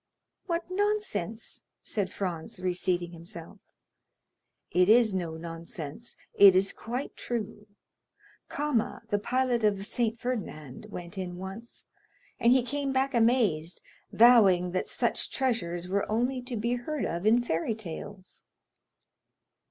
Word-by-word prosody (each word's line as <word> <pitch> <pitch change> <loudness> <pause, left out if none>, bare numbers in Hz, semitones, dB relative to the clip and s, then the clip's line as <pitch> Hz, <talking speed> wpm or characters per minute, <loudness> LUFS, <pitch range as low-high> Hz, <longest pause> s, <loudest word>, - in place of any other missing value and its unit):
"What 340 -1 -1
nonsense!" 370 - -2 0.2
said 195 -3 -2
Franz, 185 +2 -4
reseating 180 -1 -1
himself. 170 +5 -10 1.1
"It 180 +2 +4
is 225 -2 +6
no 170 -4 -3
nonsense; 165 +4 -7 0.2
it 195 -2 +8
is 195 +1 +3
quite 245 +5 -5
true. 215 -3 -5 0.8
Cama, 290 -6 -1
the 205 - +1
pilot 245 +1 0
of 210 -2 +3
the 195 - -6
Saint 230 +1 -1
Ferdinand, 205 - -5
went 180 0 -7
in 180 -1 -5
once, 195 +6 -8 0.5
and 235 - +5
he 255 -1 +5
came 280 +2 -2
back 270 +1 +1
amazed, 225 -9 +2 0.3
vowing 200 -7 +6
that 185 - -1
such - - 0
treasures 180 -10 -1
were 200 +3 -1
only 250 +4 0
to 245 -1 -5
be 235 +3 0
heard 255 +4 -2
of 175 +5 -2
in 235 +2 +5
fairy 190 +1 -1
tales." 190 -1 -9
210 Hz, 130 wpm, -29 LUFS, 180-245 Hz, 1.1 s, it